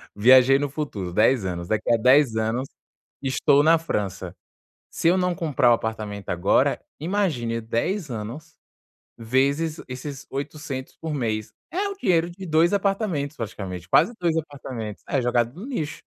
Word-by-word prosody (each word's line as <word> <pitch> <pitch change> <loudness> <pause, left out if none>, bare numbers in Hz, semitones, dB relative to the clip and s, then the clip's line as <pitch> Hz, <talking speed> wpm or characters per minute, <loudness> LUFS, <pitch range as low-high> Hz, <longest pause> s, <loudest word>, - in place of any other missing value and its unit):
viajei 130 +5 +6
no 145 0 -2
futuro, 120 - -4
10 110 +3 +3
anos, 85 -1 -4
daqui 110 +2 0
a - - +4
10 125 0 +4
anos, 115 +5 -1 0.5
estou 140 +1 +3
na 165 +2 +5
França. 95 - -3 0.6
Se 165 - +1
eu 185 - +3
não 180 -1 +1
comprar 140 -7 +2
o - - +7
apartamento 110 -3 -4
agora, 90 0 +2 0.2
imagine 150 - -1
10 140 - -2
anos, 125 +9 -7 0.6
vezes 140 +7 0
esses 135 +2 -7
800 140 -1 -5
por 160 -2 -3
mês. 110 -4 -2 0.2
É 400 +3 -1
o 400 - -6
dinheiro 175 - +2
de 190 +2 -9
2 165 +3 +3
apartamentos 195 -8 -1
praticamente, 95 -5 -6
quase 230 - +4
2 165 -2 +1
apartamentos. 130 -8 -5
É 135 -3 +1
jogado 120 +1 +1
no 220 - -7
lixo 155 - -4
135 Hz, 150 wpm, -24 LUFS, 110-160 Hz, 0.6 s, o